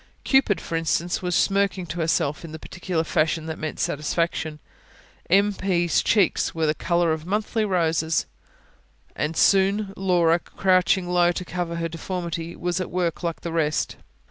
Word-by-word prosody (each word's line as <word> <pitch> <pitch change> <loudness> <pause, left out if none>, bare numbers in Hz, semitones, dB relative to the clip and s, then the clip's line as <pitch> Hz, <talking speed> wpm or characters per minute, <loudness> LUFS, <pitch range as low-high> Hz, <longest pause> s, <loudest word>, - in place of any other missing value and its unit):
Cupid, 265 -7 +3
for 165 - -5
instance, 165 +1 0
was 180 -2 -1
smirking 195 -1 +1
to 175 +1 -6
herself 155 -2 0
in 160 -2 -9
the - - -5
peculiar 180 0 -3
fashion 155 0 0
that 160 -1 -5
meant 155 -1 -4
satisfaction; 155 +1 -1 0.7
M. 200 +3 +4
P.'s 175 -3 +1
cheeks 200 -6 +2
were 160 -1 +1
the 150 - +2
colour 170 0 +1
of 160 +1 -6
monthly 215 +2 0
roses. 165 -4 +1 0.9
And 155 +2 -2
soon 195 +1 +3
Laura, 175 -3 +3
crouching 185 0 +1
low 175 -1 +3
to 180 - -5
cover 175 -1 -3
her 165 0 -2
deformity, 170 0 -5
was 175 +1 -2
at 185 - -4
work 175 -2 -1
like 170 -2 -3
the 170 - -4
rest. 155 -2 0
175 Hz, 160 wpm, -24 LUFS, 160-185 Hz, 0.9 s, M